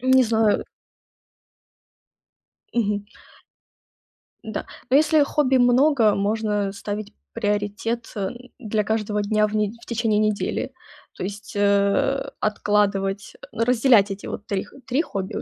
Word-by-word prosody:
Не 260 +1 +5
знаю. 220 -2 +2 2.1
Мгм. 205 -3 0 1.4
Да. 220 -2 -5 0.2
Но 265 - +6
если 310 -1 +4
хобби 280 -2 +1
много, 245 -2 +4
можно 205 -1 0
ставить 205 +1 -5 0.2
приоритет, 210 +2 -2
э, 195 -2 -1 0.3
для 215 -3 -1
каждого 210 -1 -1
дня 215 0 +2
в 210 - -5
нед 210 0 0
в - - -14
течение 225 -2 0
недели. 215 -1 -1 0.4
То - - -6
есть, 205 +2 -6
э, 205 +7 +2
откладывать, 205 -1 0 0.2
разделять 230 -3 +4
эти 195 - -6
вот 205 - -6
3 195 -2 -2
х - - -19
3 265 +4 +1
хобби 195 - -5
у - - -3
215 Hz, 125 wpm, -23 LUFS, 205-235 Hz, 2.1 s, Но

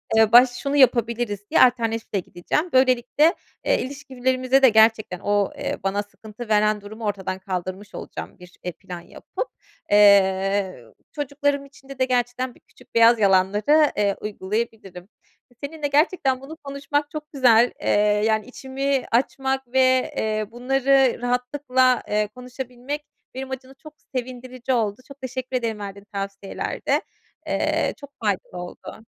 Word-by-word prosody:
eee, 220 -1 +5
baş 245 +1 +8
şunu 275 +3 -3
yapabiliriz 235 -5 +2
diye - - +5
alternatifle 230 -4 +2
gideceğim. 185 - -2
Böylelikle, 260 +6 +4 0.3
eee, - - +2
ilişkilerimize 260 -1 0
de 260 - +8
gerçekten 220 -4 +3
o, 205 -1 +1
eee, - - -3
bana 200 +1 0
sıkıntı 220 +2 -11
veren 210 0 +3
durumu 215 +2 -8
ortadan 190 -2 -3
kaldırmış 185 +1 -5
olacağım - - -8
bir, 180 0 -14
eee, 180 - -3
plan 180 -1 -9
yapıp. - - -6 0.4
Eee, 195 - +4 0.3
çocuklarım 285 0 -1
içinde 275 -1 -14
de 260 - +3
gerçekten 250 0 -1
bir - - -21
küçük - - -23
beyaz 230 0 +6
yalanları, 205 +10 +4
eee, 200 -1 +2
uygulayabilirim. 205 -2 -4 0.5
Seninle 295 0 -3
gerçekten 280 -3 +2
bunu 300 +4 -9
konuşmak 285 +1 -2
çok 305 -1 -7
güzel, 245 -3 +5
eee, - - -1 0.4
yani 220 -1 +1
içimi 265 +1 -2
açmak 265 +1 0
ve, 260 0 +2
eee, 215 -1 -1
bunları 265 +1 +2
rahatlıkla, 255 0 +1
eee, 210 0 +1
konuşabilmek 250 +3 -6 0.3
benim 265 +1 -6
açımdan 265 +1 -7
çok 310 -1 -11 0.2
sevindirici 255 0 -4
oldu. 215 -1 -1
Çok 275 -1 -14
teşekkür 260 0 -3
ederim 225 -3 -3
verdiğin 200 0 -8
tavsiyelerde. 195 0 -2 0.5
Eee, - - 0
çok 285 -1 -11
faydalı 195 -3 -2
oldu. 220 +5 -11
245 Hz, 135 wpm, -23 LUFS, 205-265 Hz, 0.5 s, baş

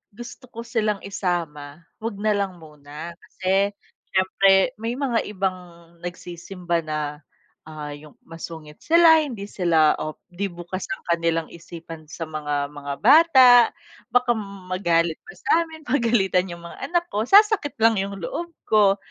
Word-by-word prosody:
gusto 240 +3 -10
ko 230 -1 -8
silang 215 -4 -1
isama, 170 -6 -4 0.2
huwag 225 -1 -4
na 215 0 +1
lang 200 -3 -1
muna. 150 +1 -10
Kasi, 195 +3 -1 0.4
siyempre 195 +3 +3
may 230 +2 -3
mga 245 -5 0
ibang 190 -2 -2 0.4
nagsisimba 175 0 -4
na, 155 -1 -3 0.6
ah, 150 -2 -7
yung 150 0 -15
masungit 160 -2 -10
sila, 330 -1 +6
hindi 230 -8 -6
sila, 165 -6 +3
o 155 0 -5 0.2
'di 200 +2 -2
bukas 175 +2 -7
ang - - -5
kanilang 165 -1 0
isipan 165 -2 -11
sa 165 - -5
mga 145 -2 -2
mga 145 -1 -5
bata, 270 0 +7 0.6
baka 245 -1 +3
m 195 -3 -8
magalit 170 -3 +1
pa 440 - -12
sa - - -9
amin, 320 -2 -13
pagalitan 225 -8 +2
yung 170 0 -9
mga 270 +10 -8
anak 345 -1 +1
ko, 210 - 0
sasakit 405 - +4
lang 225 0 +5
yung 200 0 -5
loob 340 - -5 0.2
ko. 205 -2 +4
190 Hz, 150 wpm, -23 LUFS, 165-230 Hz, 0.6 s, bata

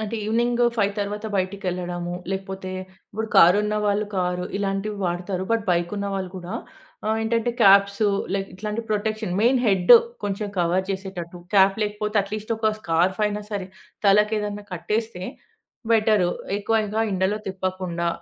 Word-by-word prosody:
అంటే 220 +1 -3
ఈవినింగ్ 240 +2 +1 0.2
5 200 -2 +2
తర్వాత 210 +2 -3
బయటికెళ్లడము, 180 -2 -2 0.2
లేకపోతే 190 -1 -4 0.4
ఇప్పుడు 220 +1 -3
కారున్నవాళ్లు 210 +3 +4
కారు 180 0 0
ఇలాంటివి 200 +1 -2
వాడతారు. 180 +2 -2
బట్ 225 -2 +1
బైక్ 175 +1 +1
ఉన్నవాళ్లు 195 -2 -3
కూడా 180 +4 -6 0.5
ఆహ్, 220 0 +1
ఏంటంటే 230 +1 +1
క్యాప్స్, 200 +1 +6 0.3
లైక్ 195 0 -2
ఇట్లాంటి 210 +3 -3
ప్రొటెక్షన్. 215 -2 -1
మెయిన్ 250 +3 +4
హెడ్ 190 +2 +5 0.3
కొంచెం 205 +1 -2
కవర్ 175 +2 +2
చేసేటట్టు 190 -3 -5 0.2
క్యాప్ 195 +1 +5
లేకపోతే 210 +1 -2
అట్లీస్ట్ 210 +2 -6
ఒక 220 -1 +1
స్కార్ఫ్ 175 +4 +1
అయినా 210 0 -1
సరే 200 -3 -3 0.4
తలకి 210 +2 +5
ఏదైనా 205 0 -4
కట్టేస్తే 185 +3 -2 0.7
బెటర్. 215 -4 +4 0.3
ఎక్కువగా 220 0 0
ఎండలో 190 +3 0
తిప్పకుండా 185 -2 -2
200 Hz, 130 wpm, -24 LUFS, 185-215 Hz, 0.7 s, క్యాప్స్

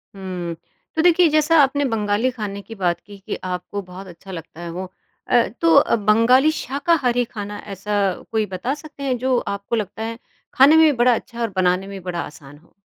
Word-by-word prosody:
हुँ, 180 -3 -5 0.4
तो 320 - +2
देखिए 350 +1 +5
जैसा 310 +2 +3
आपने 285 +1 +1
बंगाली 215 +3 +1
खाने 210 -4 -5
की 225 +3 -11
बात 180 -4 0
की 205 -1 -14
कि 195 - -6
आपको 185 +2 -4
बहुत 185 +1 -11
अच्छा 180 +2 -12
लगता 165 -1 -9
है 170 - -6
वो। 185 +3 -5 0.4
अ, 240 -2 +4 0.2
तो 330 -1 +4
अ, 280 - +5
बंगाली 230 +7 +4
शाकाहारी 275 -4 0
खाना 205 -3 -7
ऐसा 195 +2 -7 0.4
कोई 220 -1 +1
बता 205 +7 -3
सकते 295 -1 -10
हैं। 260 -2 0
जो 255 +1 +1
आपको 200 +3 -3
लगता 210 0 -4
है 230 +1 -5 0.3
खाने 275 +4 +7
में 320 0 +7
भी 310 - +5
बड़ा 245 +1 +5
अच्छा 235 +1 -7
और 230 - 0
बनाने 185 +1 +1
में 200 - -7
भी - - -16
बड़ा 170 -1 -3
आसान 145 -1 -11
हो? 165 +3 -25
215 Hz, 205 wpm, -21 LUFS, 190-260 Hz, 0.4 s, खाने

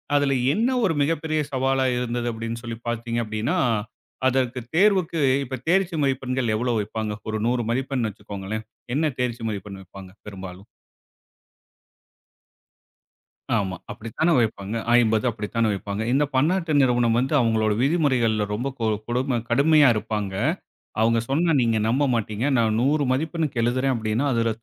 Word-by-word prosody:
அதுல 145 -1 +3 0.2
என்னா 235 +5 +1
ஒரு 180 - +2
மிகப் 150 +2 +1
பெரிய 155 -1 0
சவாலா 135 0 +1
இருந்தது? 120 -1 -2
அப்படின்னு 115 +1 -5
சொல்லிப் 115 0 -7
பாத்தீங்க 120 0 -2
அப்டீன்னா, 110 +11 -1 0.7
அதற்குத் 125 -2 -1
தேர்வுக்கு 185 -4 +3 0.2
இப்ப 130 +1 -5
தேர்ச்சி 185 0 +2
மதிப்பெண்கள் 130 -3 0
எவ்வளவு 120 0 0
வைப்பாங்க? 110 +1 -4 0.2
ஒரு 110 0 -2
100 120 0 +1
மதிப்பெண் 130 -1 -1
வச்சுக்கோங்களேன். 105 +1 -6 0.3
என்னா 155 +1 +2
தேர்ச்சி 120 -2 -2
மதிப்பெண் 100 -1 -6
வைப்பாங்க? 95 0 -12 0.2
பெரும்பாலும்! 95 -1 -9 2.9
ஆமா, 95 -3 -1
அப்படித்தானே 115 +11 -1
வைப்பாங்க. 110 -2 -1 0.2
50 110 -1 +2
அப்படித்தானே 115 +1 -1
வைப்பாங்க. 100 +1 -4
இந்தப் 145 +2 +1
பன்னாட்டு 165 +4 +1
நிறுவனம் 120 -3 +2
வந்து 130 +3 0
அவுங்களோட 110 -2 +2
விதிமுறைகள்ல 130 -8 +2
ரொம்ப 120 +6 -2
கொ 115 - -1 0.2
கொடுமை 125 +2 0
கடுமையா 145 +3 +5
இருப்பாங்க. 105 -2 -3 0.7
அவுங்க 115 +1 +3
சொன்னா 165 +5 +2
நீங்க 115 -2 +2
நம்ப 130 +5 +2
மாட்டீங்க. 110 0 -2
நான் 110 -2 +2
100 145 +3 +2
மதிப்பெண்ணுக்கு 150 -2 -1
எழுதுறேன் 130 +3 +1
அப்படின்னா, 110 +2 -1
அதுல 115 -1 +1
120 Hz, 135 wpm, -24 LUFS, 110-140 Hz, 2.9 s, கடுமையா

